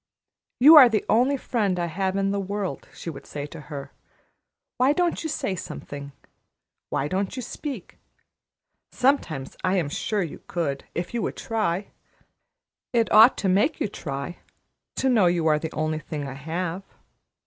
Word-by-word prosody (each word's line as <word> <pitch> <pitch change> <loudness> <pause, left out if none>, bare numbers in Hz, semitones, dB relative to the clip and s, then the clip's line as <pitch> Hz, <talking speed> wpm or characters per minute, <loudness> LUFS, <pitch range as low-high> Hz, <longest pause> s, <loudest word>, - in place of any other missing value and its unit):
"You 300 +6 +9
are 260 -5 +10
the 220 -2 0
only 255 +5 +3
friend 210 -8 -1
I 175 - 0
have 190 +3 -2
in 195 0 +1
the 200 - -1
world," 200 0 -4
she 165 - -7
would 140 - -11
say 145 -1 -5
to 150 +1 -10
her. 140 -2 -7 0.9
"Why 260 +3 +4
don't 350 +2 0
you 320 - -2
say 205 -9 -2
something? 140 -4 -7 0.8
Why 135 - -1
don't 190 +3 -2
you 255 - -4
speak? 265 - -7 0.9
Sometimes 245 - 0
I 185 +1 +2
am 165 -6 0
sure 205 +6 -1
you 165 - -7
could, 145 -6 -2
if 175 +4 -3
you 235 - -1
would - - -3
try. 205 -4 -1 1.0
It 230 -2 +2
ought 220 +4 +8
to 195 - -1
make 205 - +2
you - - 0
try, 140 -3 -6 0.6
to 265 - 0
know 225 -8 +4
you 175 -2 +1
are 155 -1 +4
the 160 +1 -4
only 155 0 -1
thing 150 -2 -5
I 135 - -6
have. 165 +6 -4
185 Hz, 170 wpm, -25 LUFS, 155-225 Hz, 1.0 s, are